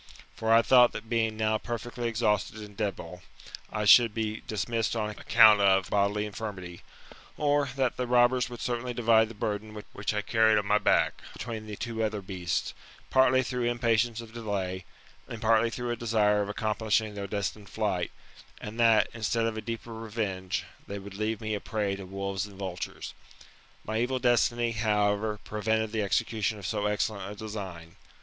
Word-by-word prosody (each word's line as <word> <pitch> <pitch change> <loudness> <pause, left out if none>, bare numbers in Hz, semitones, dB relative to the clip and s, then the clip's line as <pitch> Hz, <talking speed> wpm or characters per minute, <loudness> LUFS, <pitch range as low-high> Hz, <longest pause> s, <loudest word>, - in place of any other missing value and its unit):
For 110 0 -1
I 115 +1 +6
thought 125 -1 +6
that 110 - -7
being 110 -2 +1
now 110 0 +1
perfectly 120 +1 -4
exhausted 110 -3 0
and 105 -1 -10
debile, 95 -4 -4 0.5
I 105 -1 -2
should 115 0 +7
be 110 -1 -2
dismissed 110 +2 -1
on 105 -1 -1
account 110 -1 +6
of 95 -1 +3
bodily 100 +1 +1
infirmity: 100 -5 -7 0.6
or, 145 -2 +2
that 130 -3 0
the 125 - -2
robbers 125 +1 +3
would 120 -1 -8
certainly 120 0 -2
divide 110 -2 +4
the 115 - -10
burden 105 +1 -4
which 100 - -2
I 105 - -1
carried 110 -1 +4
on 105 - 0
my 105 +1 +3
back, - - +2
between 110 -3 -6
the 105 - -6
two 115 0 -3
other 110 -1 -1
beasts, 90 -3 -2 0.4
partly 130 0 +4
through 125 -1 -2
impatience 120 -1 +1
of 115 -1 -12
delay, 95 -5 -3 0.4
and 115 - -7
partly 115 +1 +3
through 120 +1 -4
a - - 0
desire 110 -3 +2
of 100 - -3
accomplishing 110 0 0
their 100 -1 -5
destined 100 0 -4
flight; 100 -5 -1 0.5
and 110 +2 -8
that, 115 -3 +5
instead 115 0 0
of 115 -1 -1
a 110 - -4
deeper 115 +1 -6
revenge, 105 -5 -3 0.2
they 100 - -5
would 100 0 -9
leave 110 +1 -2
me 110 -1 -3
a 105 - -1
prey 105 -3 -2
to 95 -1 -9
wolves 100 +1 -3
and 100 -2 -14
vultures. 95 -4 -5 0.7
My 110 +1 -1
evil 130 +2 0
destiny, 120 -1 +2
however, 105 -1 +1
prevented 110 0 -1
the 110 -1 -1
execution 110 +1 0
of 100 - -9
so 105 +1 -1
excellent 105 -1 -2
a - - -8
design. 95 -6 -7
110 Hz, 175 wpm, -28 LUFS, 105-115 Hz, 0.7 s, should